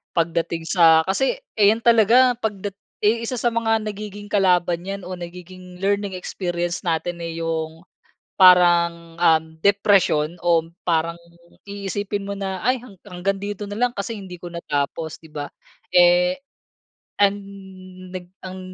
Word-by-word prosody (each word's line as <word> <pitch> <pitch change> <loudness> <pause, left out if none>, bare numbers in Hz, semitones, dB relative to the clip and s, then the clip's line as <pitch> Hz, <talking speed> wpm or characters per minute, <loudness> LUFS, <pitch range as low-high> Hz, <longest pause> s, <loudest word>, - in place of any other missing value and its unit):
pagdating 165 0 -1
sa 165 -3 +6
kasi, 270 - 0 0.2
eh, 205 - +6
'yan 225 - -6
talaga 235 +2 +5
pagdat 205 -3 -4 0.3
yung 220 +2 +3
isa 240 +2 -3
sa 240 - +1
mga 225 -1 +1
nagiging 205 -1 -7
kalaban 180 -3 +2
'yan 195 0 -5
o 185 - -7
nagiging 180 +1 -10
learning 200 0 0
experience 175 -1 -3
natin 170 +1 -1
eh, 165 0 -5
yung 160 0 -3 0.6
parang, 170 -2 +5
um, 160 -2 +4 0.2
depresyon 195 -5 +3
o 170 -2 +3 0.2
parang 165 0 0 0.5
iisipin 200 0 -4
mo 200 - -4
na, 190 -1 -4
"ay 255 +1 +2 0.3
hanggang 185 +2 -2
dito 205 0 -5
na 205 - -6
lang 245 0 +1
kasi 210 +3 -4
hindi 190 -3 -9
ko 175 - -7
natapos." 160 -1 -3
'Di 160 - -15
ba? 145 -1 -5 0.4
Eh, 180 +1 +5 0.8
ang 200 -1 +5 0.8
nag 180 -1 -6 0.2
ang 185 0 -7
185 Hz, 140 wpm, -22 LUFS, 170-205 Hz, 0.8 s, sa